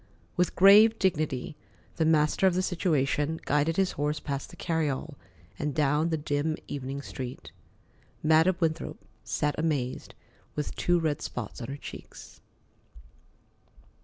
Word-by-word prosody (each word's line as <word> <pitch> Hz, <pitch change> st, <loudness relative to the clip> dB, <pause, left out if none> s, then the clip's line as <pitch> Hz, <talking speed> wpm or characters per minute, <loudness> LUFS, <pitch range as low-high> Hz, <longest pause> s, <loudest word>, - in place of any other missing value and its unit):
With 180 Hz, 0 st, +1 dB
grave 210 Hz, +4 st, +7 dB
dignity, 155 Hz, -7 st, -1 dB, 0.4 s
the 160 Hz, -, +2 dB
master 155 Hz, +4 st, +3 dB
of 180 Hz, -, +2 dB
the 185 Hz, -, +1 dB
situation 160 Hz, -3 st, 0 dB
guided 150 Hz, +3 st, +1 dB
his 190 Hz, -2 st, +2 dB
horse 150 Hz, +1 st, -1 dB
past 140 Hz, -2 st, -4 dB
the -, -, -12 dB
carryall 155 Hz, -2 st, -2 dB, 0.5 s
and 150 Hz, -2 st, -2 dB
down 150 Hz, +2 st, +2 dB
the 160 Hz, -, 0 dB
dim 150 Hz, +1 st, -1 dB
evening 140 Hz, 0 st, -5 dB
street. 130 Hz, -2 st, -7 dB, 0.7 s
Madam 160 Hz, +4 st, +4 dB
Winthrop 160 Hz, -2 st, -1 dB, 0.3 s
sat 150 Hz, 0 st, -1 dB
amazed, 145 Hz, -6 st, -2 dB, 0.4 s
with 150 Hz, -, -3 dB
two 175 Hz, 0 st, +2 dB
red 155 Hz, -3 st, -1 dB
spots 125 Hz, 0 st, -6 dB
on 115 Hz, -, -5 dB
her 140 Hz, +2 st, -5 dB
cheeks. -, -, -11 dB
155 Hz, 135 wpm, -28 LUFS, 145-165 Hz, 0.7 s, grave